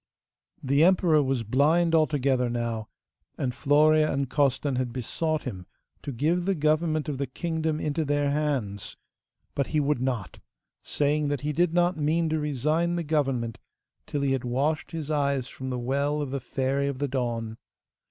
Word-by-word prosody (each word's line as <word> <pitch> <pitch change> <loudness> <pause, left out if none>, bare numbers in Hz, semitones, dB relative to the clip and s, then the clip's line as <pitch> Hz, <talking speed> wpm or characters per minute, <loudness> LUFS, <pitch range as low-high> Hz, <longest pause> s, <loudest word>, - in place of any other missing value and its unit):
The 140 +3 +3
emperor 170 -4 +4
was 135 -3 0
blind 155 +9 +3
altogether 140 -5 +2
now, 115 -2 -3 0.5
and 125 -2 -1
Florea 155 +3 +4
and 135 0 -1
Costan 140 0 +1
had 125 -1 -1
besought 155 +6 -2
him 95 -8 -6 0.3
to 140 - -5
give 160 +8 0
the 195 0 +1
government 155 0 +1
of 140 -3 -3
the 140 - -1
kingdom 160 +3 -2
into 155 +1 -1
their 145 -1 +1
hands; 135 -10 -2 0.6
but 140 - -1
he 155 - 0
would 145 -3 +1
not, 125 -7 -3 0.4
saying 150 +1 0
that 145 -3 -1
he 150 +1 -2
did 175 +1 +1
not 175 0 +2
mean 160 +2 +1
to 155 0 0
resign 155 +4 0
the 170 - -1
government 135 -7 -1 0.5
till 145 - -2
he 140 -1 +1
had 135 -1 0
washed 135 +6 -1
his 160 -3 -5
eyes 140 -4 0
from 130 -1 -7
the 125 - -2
well 140 +4 0
of 145 -3 -3
the 140 - -2
Fairy 135 +2 -1
of 140 -2 -3
the 145 +2 -1
Dawn. 120 -4 -2
145 Hz, 170 wpm, -27 LUFS, 130-155 Hz, 0.6 s, emperor